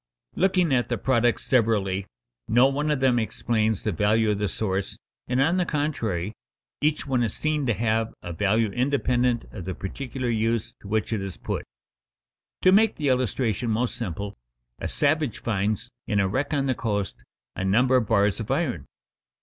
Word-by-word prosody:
Looking 180 Hz, -5 st, +2 dB
at 125 Hz, -2 st, +1 dB
the 120 Hz, -, 0 dB
products 120 Hz, +1 st, +1 dB
severally, 100 Hz, -6 st, +1 dB, 0.4 s
no 120 Hz, +3 st, +5 dB
one 145 Hz, +3 st, +1 dB
of 150 Hz, -3 st, 0 dB
them 125 Hz, -2 st, +4 dB
explains 110 Hz, -1 st, 0 dB
the 105 Hz, -, 0 dB
value 105 Hz, +4 st, +2 dB
of 100 Hz, -, -1 dB
the 105 Hz, -1 st, 0 dB
source, 95 Hz, -3 st, -2 dB, 0.3 s
and, 125 Hz, +1 st, 0 dB
on 165 Hz, +7 st, +3 dB
the 180 Hz, -, +3 dB
contrary, 115 Hz, -, -1 dB, 0.5 s
each 150 Hz, 0 st, +1 dB
one 130 Hz, -3 st, +1 dB
is 115 Hz, -4 st, -1 dB
seen 155 Hz, -3 st, 0 dB
to 115 Hz, -, +2 dB
have 110 Hz, +1 st, 0 dB
a 85 Hz, -, -5 dB
value 105 Hz, +5 st, +1 dB
independent 125 Hz, -1 st, +1 dB
of 95 Hz, -6 st, -7 dB
the 95 Hz, -1 st, -4 dB
particular 130 Hz, +5 st, -5 dB
use 115 Hz, 0 st, 0 dB
to -, -, -11 dB
which 110 Hz, +2 st, 0 dB
it 105 Hz, -, -1 dB
is 95 Hz, -2 st, -5 dB
put. -, -, -4 dB, 1.0 s
To 185 Hz, -, +7 dB
make 215 Hz, +2 st, +5 dB
the 145 Hz, -3 st, 0 dB
illustration 125 Hz, -2 st, 0 dB
most 115 Hz, +3 st, 0 dB
simple: 100 Hz, -1 st, -4 dB, 0.5 s
a -, -, -3 dB
savage 150 Hz, -3 st, +1 dB
finds 110 Hz, +2 st, -1 dB, 0.2 s
in 105 Hz, -3 st, +1 dB
a 100 Hz, -, +3 dB
wreck 130 Hz, +9 st, -1 dB
on 140 Hz, -2 st, +1 dB
the 130 Hz, -, +2 dB
coast 105 Hz, -5 st, -3 dB, 0.3 s
a -, -, -3 dB
number 125 Hz, +7 st, +3 dB
of 115 Hz, -4 st, 0 dB
bars 100 Hz, -1 st, +2 dB
of 110 Hz, -, -5 dB
iron. 135 Hz, -, -1 dB
115 Hz, 180 wpm, -25 LUFS, 105-135 Hz, 1.0 s, To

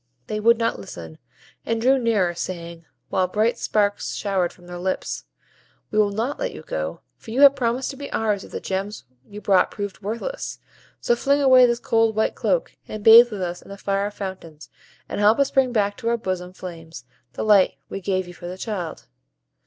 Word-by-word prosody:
They 215 Hz, -, -3 dB
would 230 Hz, +2 st, +5 dB
not 230 Hz, -, -1 dB
listen; 85 Hz, -5 st, -10 dB, 0.4 s
and 230 Hz, 0 st, -1 dB
drew 260 Hz, +3 st, +3 dB
nearer, 210 Hz, -7 st, +1 dB
saying, 170 Hz, -1 st, -6 dB, 0.2 s
while 185 Hz, -1 st, +1 dB
bright 215 Hz, +5 st, 0 dB
sparks 205 Hz, -1 st, 0 dB
showered 190 Hz, -4 st, 0 dB
from 175 Hz, -, -19 dB
their 175 Hz, 0 st, -8 dB
lips, 185 Hz, +1 st, -3 dB, 0.7 s
"We 215 Hz, -, +1 dB
will 210 Hz, -1 st, +4 dB
not 225 Hz, +8 st, -2 dB
let -, -, -3 dB
you -, -, -9 dB
go, -, -, -4 dB, 0.2 s
for -, -, -14 dB
you 245 Hz, +5 st, 0 dB
have 280 Hz, -1 st, +8 dB
promised 250 Hz, +2 st, -1 dB
to 270 Hz, -, -11 dB
be 285 Hz, 0 st, -7 dB
ours 210 Hz, -3 st, 0 dB
if -, -, -13 dB
the -, -, -4 dB
gems 195 Hz, +2 st, -4 dB, 0.3 s
you 210 Hz, 0 st, -9 dB
brought 195 Hz, -3 st, +3 dB
proved 205 Hz, -1 st, -6 dB
worthless; 230 Hz, -, -4 dB, 0.4 s
so 240 Hz, -, +2 dB
fling 280 Hz, +4 st, +2 dB
away 260 Hz, -3 st, +7 dB
this 235 Hz, 0 st, +1 dB
cold 225 Hz, -2 st, +2 dB
white 220 Hz, -, +1 dB
cloak, -, -, -1 dB
and 215 Hz, -1 st, -7 dB
bathe 230 Hz, +2 st, +9 dB
with 200 Hz, -3 st, -4 dB
us 175 Hz, 0 st, -4 dB
in -, -, -17 dB
the 200 Hz, -, -8 dB
fire 200 Hz, 0 st, -1 dB
fountains, 190 Hz, -6 st, -8 dB, 0.4 s
and -, -, -4 dB
help 210 Hz, +2 st, +5 dB
us 280 Hz, -1 st, +2 dB
bring 265 Hz, -2 st, +3 dB
back 205 Hz, -3 st, 0 dB
to 230 Hz, -2 st, -2 dB
our 235 Hz, -, +1 dB
bosom 185 Hz, -4 st, -4 dB
flames 165 Hz, -7 st, -9 dB, 0.3 s
the -, -, -4 dB
light 205 Hz, -3 st, +4 dB
we 195 Hz, -, -6 dB
gave 185 Hz, -1 st, -1 dB
you 175 Hz, -, -10 dB
for 175 Hz, -, -9 dB
the 180 Hz, +1 st, -6 dB
child." 190 Hz, -, -5 dB
205 Hz, 205 wpm, -23 LUFS, 185-235 Hz, 0.7 s, bathe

